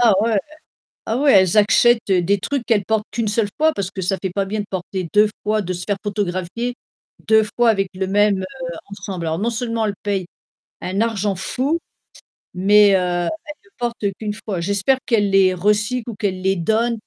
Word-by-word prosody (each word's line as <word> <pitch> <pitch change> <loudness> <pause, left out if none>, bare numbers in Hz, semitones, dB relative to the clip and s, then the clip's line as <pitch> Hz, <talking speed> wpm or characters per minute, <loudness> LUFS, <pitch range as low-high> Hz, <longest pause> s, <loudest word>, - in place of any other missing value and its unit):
ah, 230 -5 +5
ouais 225 -3 +2 0.7
ah, 225 - -1
ouais, 280 +1 +4
elles 185 +2 +1
achètent 225 +3 +5
des 185 +2 +2
trucs 265 +5 -3
qu'elles 215 -4 +2
portent 220 +1 0
qu'une 230 -2 -2
seule 210 0 +1
fois 315 +1 +3
parce 195 -5 -3
que 190 - -6
ça 190 +1 0
fait 190 - -2
pas 195 +2 -1
bien 210 +2 -3
de 205 - -5
porter 185 -1 -4
2 210 0 +5
fois, 215 0 0
de 185 0 -3
se 180 0 -5
faire 205 -1 0
photographier 205 +3 -3 0.5
2 220 0 +5
fois 240 -1 +5
avec 195 -3 0
le 190 +1 -2
même, 205 0 +3
heu, - - -3 0.5
ensemble. 200 -3 -6
Alors 160 0 -1
non 215 +5 0
seulement 230 -1 -1
elles 205 - -2
payent 195 -3 -1 0.6
un 190 +2 -3
argent 210 -3 0
fou, 265 - -1 0.8
mais 205 +3 +5
heu, - - +5
elles 175 -1 -1
ne 315 -2 -9
le - - -30
portent 235 -4 -2
qu'une 210 -1 -3
fois. 200 -4 -5
J'espère 200 +8 +1
qu'elle 210 -4 +2
les 190 -1 +4
recycle 210 +6 0
ou - - -7
qu'elle 190 -3 -2
les 190 0 +1
donne 225 +7 0
205 Hz, 205 wpm, -20 LUFS, 190-225 Hz, 0.8 s, ah